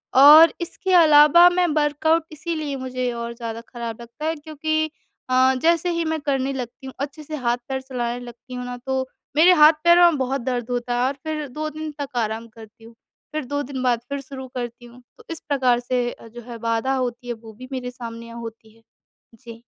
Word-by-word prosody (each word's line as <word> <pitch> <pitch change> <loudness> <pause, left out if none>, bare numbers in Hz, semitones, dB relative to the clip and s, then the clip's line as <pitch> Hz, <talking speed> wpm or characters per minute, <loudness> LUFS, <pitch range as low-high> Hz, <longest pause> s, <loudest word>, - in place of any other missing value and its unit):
और 300 +4 +9
इसके 375 +2 -4
अलावा 315 0 +7
मैं 355 0 +1
वर्कआउट 305 +2 +2
इसीलिए 310 -2 -4
मुझे 255 -1 -3
और 235 0 -5
ज़्यादा 230 -1 -6
खराब 235 -2 -6
लगता 235 +6 -9
है। 320 +1 0
क्योंकि 310 +1 -2 0.4
अ, 260 +1 +4
जैसे 335 +1 +2
ही 335 0 -1
मैं 320 0 -1
करने 275 -1 -1
लगती 255 0 -7
हूँ 265 - -8
अच्छे 285 +3 -5
से 310 +1 -6
हाथ-पैर 250 0 -2
चलाने 245 -2 -4
लगती 245 +2 -12
हूँ 250 0 -5
ना, 245 0 -6
तो 260 +1 -3 0.3
मेरे 340 +4 +7
हाथ-पैरों 340 +2 +6
में 305 - -2
बहुत 265 0 -1
दर्द 245 -1 -3
होता 245 0 -2
है 245 - 0
और 270 - -1
फिर 310 -2 -3
2 305 +4 -4
दिन 310 +1 -6
तक 280 -2 -6
आराम 225 0 -2
करती 220 0 -16
हूँ, 230 +1 -14 0.4
फिर 305 -2 -3
2 285 +3 -2
दिन 265 -1 -6
बाद 245 -2 +2
फिर 280 0 -3
शुरू 265 -1 -9
करती 240 -1 -6
हूँ। 240 +1 -15 0.2
तो - - -16
इस 330 - -5
प्रकार 255 -4 +2
से 245 0 -1
अ, - - -13
जो 240 +2 -11
है 235 -1 -7
बाधा 230 +3 -1
होती 245 -1 -3
है 240 - -2
वो 225 -1 -13
भी 255 +4 -11
मेरे 250 -2 -4
सामने 230 -1 -9
होती 225 -1 -10
है, 225 - -24 0.5
जी। 230 -1 -13
260 Hz, 205 wpm, -22 LUFS, 240-300 Hz, 0.5 s, और